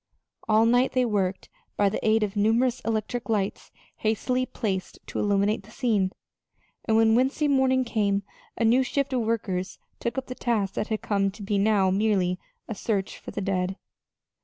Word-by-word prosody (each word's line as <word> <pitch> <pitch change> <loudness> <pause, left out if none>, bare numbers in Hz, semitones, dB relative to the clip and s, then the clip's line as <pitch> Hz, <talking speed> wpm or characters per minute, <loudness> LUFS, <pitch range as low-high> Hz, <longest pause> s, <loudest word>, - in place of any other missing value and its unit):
All 220 +1 +5
night 245 +3 +3
they 255 -1 +3
worked 195 -4 -1 0.3
by 205 - +4
the 195 - -2
aid 220 0 +3
of 205 0 -3
numerous 230 +4 +2
electric 225 +2 -3
lights 205 -3 -1 0.3
hastily 250 +4 0
placed 195 -6 -3
to - - -5
illuminate 205 +1 +1
the 200 - -18
scene; 215 -5 0 0.7
and 220 -1 +3
when 225 0 +5
Wednesday 265 +5 +2
morning 265 -2 +3
came, 205 -4 0 0.3
a 230 - +1
new 240 +4 +5
shift 275 +1 -1
of 250 - +1
workers 205 -5 -2 0.2
took 235 - -3
up 265 - -2
the 255 - -6
task 215 -6 -1
that 210 - -2
had 220 -1 -3
come 200 -1 +1
to 205 +2 -10
be 200 0 0
now 200 -2 +3
merely 190 -3 +1 0.3
a 225 - -3
search 200 -2 -2
for - - -9
the - - -4
dead. 190 -1 -1
215 Hz, 180 wpm, -26 LUFS, 200-240 Hz, 0.7 s, All